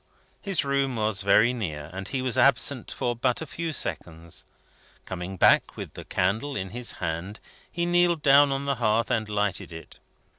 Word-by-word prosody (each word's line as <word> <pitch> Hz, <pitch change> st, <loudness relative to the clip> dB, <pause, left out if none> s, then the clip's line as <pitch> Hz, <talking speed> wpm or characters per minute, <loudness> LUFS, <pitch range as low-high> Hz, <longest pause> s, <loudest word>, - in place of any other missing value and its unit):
His 195 Hz, -7 st, 0 dB
room 140 Hz, -2 st, 0 dB
was 110 Hz, -2 st, -1 dB
very 105 Hz, +5 st, +4 dB
near, 80 Hz, -10 st, -5 dB
and 95 Hz, +1 st, -6 dB
he 130 Hz, +2 st, -2 dB
was 125 Hz, -3 st, 0 dB
absent -, -, +2 dB
for 120 Hz, 0 st, -2 dB
but 125 Hz, +1 st, 0 dB
a 160 Hz, -, -5 dB
few 165 Hz, +2 st, -4 dB
seconds. 85 Hz, -, -5 dB, 0.6 s
Coming 95 Hz, +1 st, -6 dB
back -, -, +4 dB
with -, -, -7 dB
the -, -, -9 dB
candle 110 Hz, +10 st, -1 dB
in 95 Hz, -1 st, -4 dB
his 120 Hz, +1 st, -2 dB
hand, 85 Hz, +5 st, -4 dB, 0.3 s
he 170 Hz, 0 st, -1 dB
kneeled 175 Hz, -2 st, +2 dB
down 140 Hz, 0 st, +6 dB
on 135 Hz, +1 st, -2 dB
the 140 Hz, 0 st, 0 dB
hearth 115 Hz, +1 st, +1 dB
and 110 Hz, -2 st, 0 dB
lighted 105 Hz, -3 st, -2 dB
it. 80 Hz, 0 st, -9 dB
115 Hz, 180 wpm, -26 LUFS, 95-140 Hz, 0.6 s, down